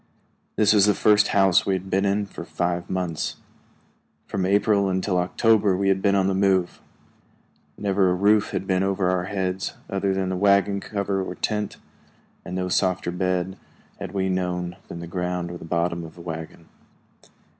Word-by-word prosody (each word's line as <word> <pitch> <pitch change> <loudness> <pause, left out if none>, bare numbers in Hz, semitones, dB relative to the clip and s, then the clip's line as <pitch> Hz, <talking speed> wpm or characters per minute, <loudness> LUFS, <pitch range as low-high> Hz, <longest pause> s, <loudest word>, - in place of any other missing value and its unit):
This 105 -1 +4
was 105 -1 +5
the 105 - +3
first 105 -1 +4
house 95 -3 +4
we 95 - 0
had 95 +1 -6
been 95 +2 +2
in 100 +1 +1
for 100 - -9
five 85 0 -2
months. 90 -4 -2 0.9
From 95 -2 -2
April 100 0 +3
until 95 0 0
October 100 +2 +2
we 100 0 +1
had 95 0 +2
been 100 -1 +3
on 95 -1 +2
the 95 - +1
move. 95 -2 +1 1.0
Never 100 -2 +2
a 90 - +1
roof 100 +2 +3
had - - -3
been 95 -1 +1
over 95 -1 +1
our 90 -1 0
heads 95 -1 -3 0.2
other 95 0 0
than 95 -1 -1
the 95 - -1
wagon 100 +1 +3
cover 100 -1 -2
or - - -6
tent, 105 -1 -2 0.7
and 90 - -6
no 90 0 -1
softer 90 -1 0
bed 90 +1 -2 0.4
had - - -6
we 95 -1 -1
known 90 -1 -2
than 85 - -7
the - - -6
ground 90 0 -3
or 85 - -7
the - - -9
bottom 85 0 -1
of 80 -1 -10
the 85 - -11
wagon. 80 0 -7
95 Hz, 180 wpm, -24 LUFS, 90-100 Hz, 1.0 s, was